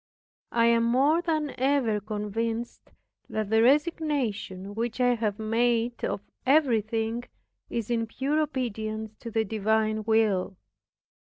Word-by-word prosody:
I 230 Hz, -1 st, +4 dB
am 230 Hz, 0 st, +4 dB
more 275 Hz, +8 st, +3 dB
than 310 Hz, -4 st, -1 dB
ever 260 Hz, -5 st, +2 dB
convinced 225 Hz, +3 st, -4 dB, 0.4 s
that 215 Hz, -1 st, -3 dB
the 220 Hz, 0 st, +5 dB
resignation 255 Hz, -, 0 dB
which 230 Hz, +3 st, -3 dB
I 245 Hz, 0 st, +4 dB
have 215 Hz, -3 st, -1 dB
made 230 Hz, +2 st, 0 dB
of 200 Hz, -1 st, -1 dB, 0.2 s
everything 230 Hz, -4 st, +1 dB, 0.4 s
is 230 Hz, -1 st, -3 dB
in 230 Hz, -1 st, 0 dB
pure 275 Hz, +7 st, -1 dB
obedience 220 Hz, -6 st, -3 dB
to 235 Hz, -, -7 dB
the 225 Hz, 0 st, 0 dB
divine 215 Hz, +1 st, 0 dB
will. 210 Hz, -4 st, +1 dB
230 Hz, 120 wpm, -27 LUFS, 215-250 Hz, 0.4 s, the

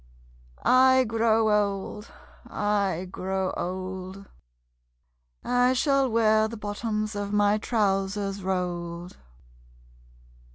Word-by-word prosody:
I 260 Hz, 0 st, +5 dB
grow 225 Hz, -1 st, +2 dB
old... 205 Hz, +1 st, -1 dB, 0.4 s
I 200 Hz, -3 st, -1 dB
grow 190 Hz, 0 st, -2 dB
old... 185 Hz, +1 st, -5 dB, 1.2 s
I 245 Hz, +1 st, +2 dB
shall 275 Hz, 0 st, +2 dB
wear 220 Hz, -1 st, +3 dB
the 230 Hz, +1 st, -8 dB
bottoms 215 Hz, +1 st, -3 dB
of 205 Hz, 0 st, -3 dB
my 205 Hz, 0 st, +2 dB
trousers 200 Hz, -2 st, -1 dB
rolled. 175 Hz, -2 st, -4 dB
205 Hz, 85 wpm, -26 LUFS, 190-225 Hz, 1.2 s, I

